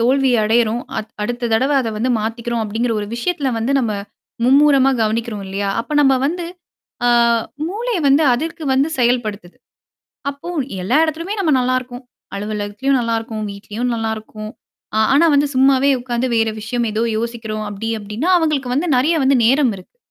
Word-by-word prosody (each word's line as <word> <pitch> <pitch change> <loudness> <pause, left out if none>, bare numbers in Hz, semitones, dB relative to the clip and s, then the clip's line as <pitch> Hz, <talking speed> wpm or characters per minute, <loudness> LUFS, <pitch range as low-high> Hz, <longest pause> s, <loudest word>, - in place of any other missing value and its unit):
தோல்வி 265 +3 +3
அடையறோம். 230 +1 +2 0.2
அ - - +1 0.2
அடுத்த 240 +2 -2
தடவ 260 +6 +2
அத 240 - -2
வந்து 240 +4 0
மாத்திக்கிறோம். 230 +1 -2
அப்டிங்கிற 225 +3 -1
ஒரு 205 - -4
விஷயத்தில 285 +2 -1
வந்து 230 +5 -1
நம்ம 230 -5 0 0.5
மும்முரமா 275 0 +5
கவனிக்கிறோம் 220 -1 -2
இல்லையா? 195 +1 -3
அப்ப 295 +6 -3
நம்ம 270 -2 +5
வந்து 345 +3 -2 0.6
ஆ - - +4 0.6
மூளைய 450 +2 -2
வந்து 280 +3 +4
அதற்கு 320 +6 -4
வந்து 270 +3 +3
செயல்படுத்துது. 220 -7 -1 0.7
அப்போ, 280 +5 -8 0.3
எல்லா 235 +10 +1
இடத்தலுமே 330 +5 -2
நம்ம 330 -6 +1
நல்லாருக்கோம். 255 0 -2 0.3
அலுவலகத்திலயும் 210 +6 -1
நல்லாருக்கும். 225 -2 -2
வீட்லயும் 210 +5 -4
நல்லாருக்கும். 220 -1 -5 0.5
அ - - +3
ஆனா 315 +4 +5
வந்து 285 +1 +3
சும்மாவே 270 +1 +4
உட்காந்து 245 0 -2
வேற 225 -1 +2
விஷயம் 235 +2 -2
ஏதோ 215 +2 0
யோசிக்கிறோம் 220 -2 -4
அப்டி 210 +2 -5
அப்டின்னா, 215 - -3
அவங்களுக்கு 285 -6 0
வந்து 325 +5 0
நெறைய 310 +7 +2
வந்து 270 -1 +4
நேரம் 260 -2 +3
இருக்கு. 185 - -16
245 Hz, 150 wpm, -19 LUFS, 220-275 Hz, 0.7 s, மும்முரமா